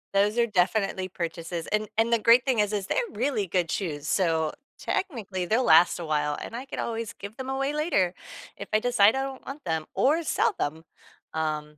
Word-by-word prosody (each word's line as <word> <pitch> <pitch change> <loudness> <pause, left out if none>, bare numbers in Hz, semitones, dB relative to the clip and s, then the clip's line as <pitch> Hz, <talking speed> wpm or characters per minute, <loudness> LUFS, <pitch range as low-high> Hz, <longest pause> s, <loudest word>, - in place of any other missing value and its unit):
Those 205 +3 +2
are 235 -1 +3
definitely 190 -1 +1
purchases, 170 -1 -5
and 215 0 0
and 225 +1 +2
the 235 - +4
great 230 +3 +6
thing 255 -5 +1
is, 210 0 +1
is 200 -2 -2
they're - - +1
really 230 -4 -1
good 175 -1 0
shoes, 155 -6 -3
so 160 -4 +1 0.3
technically, 210 - -3
they'll 225 +8 +2
last 165 -3 +5
a 170 - -5
while 150 -1 0
and - - -7
I 250 +3 -5
could 270 - -7
always 230 -1 -3
give 200 +3 -10
them 260 0 -5
away 270 +1 -1
later 295 - +1 0.4
if - - -7
I 215 - +5
decide 220 -2 +4
I 270 - 0
don't 270 -1 -6
want 280 +2 -8
them 160 -2 -2
or 310 +5 +2
sell 235 -7 +1
them, 155 +3 -2 0.5
um 150 -1 -3
205 Hz, 205 wpm, -26 LUFS, 170-240 Hz, 0.5 s, great